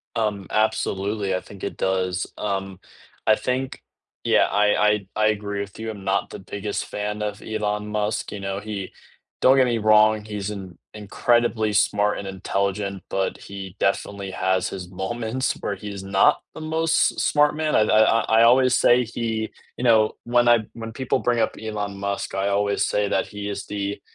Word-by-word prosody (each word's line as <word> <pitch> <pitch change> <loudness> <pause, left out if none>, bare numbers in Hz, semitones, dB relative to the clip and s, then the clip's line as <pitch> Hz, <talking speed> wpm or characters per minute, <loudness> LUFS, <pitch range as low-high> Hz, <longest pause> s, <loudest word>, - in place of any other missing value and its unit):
Um, 105 -4 -1
absolutely, 100 -2 0
I 90 - -2
think 100 -2 -13
it 100 - -4
does. 95 -1 0
Um, 95 -2 -3 0.5
I 110 - +6
think 130 +3 -3 0.4
yeah, - - +4
I 105 0 +3
I 105 -2 +1
I 110 0 +3
agree 100 -1 -1
with 100 -1 -8
you, 110 0 -4
I'm 100 -3 -7
not 95 +1 0
the - - -8
biggest 100 +2 -4
fan 105 0 -4
of 105 0 -3
Elon 105 -1 -2
Musk, 105 0 -2
you 105 - -6
know, 95 0 -3
he 105 -2 -5 0.5
don't 130 - +6
get 130 -1 +5
me 120 -2 +1
wrong, 110 0 +4
he's 105 -2 -4
an 95 -5 -7 0.2
incredibly 110 +1 +1
smart 105 +1 +2
and 100 - -6
intelligent, 100 0 -2
but 95 0 -1
he 95 -2 -9
definitely 100 0 -1
has 95 0 0
his 90 -2 -7
moments 115 +7 -2
where 100 - -2
he's 100 0 -7
not 95 0 +3
the - - -9
most 160 +1 +2
s - - -2
smart 150 0 +3
man 155 0 0
I've 110 - +3
I 110 - +5
I 115 +1 +4 0.2
I, 115 - +7
uh, - - +8
always 130 +1 +5
say 125 0 +4
he, 110 -1 -3 0.3
you - - -5
know 110 -3 +4
when 120 0 +3
I 120 -1 +6
when 115 -1 -7
people 130 +3 -1
bring 120 -1 +1
up - - +1
Elon 105 -2 -4
Musk, 100 0 -3
I 95 +1 0
always 100 0 +1
say 105 0 0
that 95 - 0
he 105 0 -6
is 100 0 -5
the 100 -1 -3
105 Hz, 190 wpm, -23 LUFS, 100-110 Hz, 0.5 s, uh